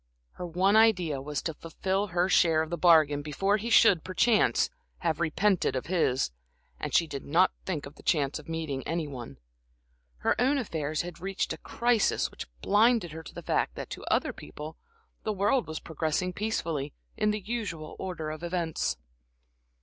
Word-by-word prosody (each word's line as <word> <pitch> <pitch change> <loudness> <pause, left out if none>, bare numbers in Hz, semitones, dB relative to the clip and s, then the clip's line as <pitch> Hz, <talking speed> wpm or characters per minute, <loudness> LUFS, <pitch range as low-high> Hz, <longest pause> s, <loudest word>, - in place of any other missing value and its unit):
Her 180 - -6
one 185 +5 +2
idea 180 -11 +4
was 145 0 -4
to 160 - -2
fulfil 190 +6 -2
her 175 0 +1
share 165 -4 +4
of 160 - -8
the - - 0
bargain 155 -4 +5
before 195 +8 +1
he 225 +3 -4
should, 200 -7 +6
perchance, 210 +4 +3 0.3
have 165 -3 0
repented 175 -1 +1
of 130 - -2
his, 150 - +1 0.5
and - - -4
she 170 - +4
did 140 -4 -6
not 175 +6 +3 0.2
think 165 -6 -2
of 140 - -10
the - - -16
chance 145 -3 +1
of 150 - -13
meeting 160 -5 -3
any 165 -1 -1
one. 120 - -8 0.8
Her - - +2
own 270 +3 +3
affairs 155 - -2
had 175 -2 -8
reached 195 +1 -2
a - - -7
crisis 235 -2 +1
which - - -8 0.2
blinded 215 -3 +3
her 160 +1 -7
to - - -12
the - - -7
fact - - 0
that - - -7
to - - -6
other - - +1
people, 150 - -9 0.5
the 215 - -2
world 205 +6 +1
was 160 -1 -4
progressing 160 +3 -2
peacefully, 170 - -2 0.2
in 210 - +1
the 210 0 0
usual 205 -8 -4
order 165 -5 -4
of 155 0 -7
events. 170 -2 -1
170 Hz, 180 wpm, -29 LUFS, 155-195 Hz, 0.8 s, should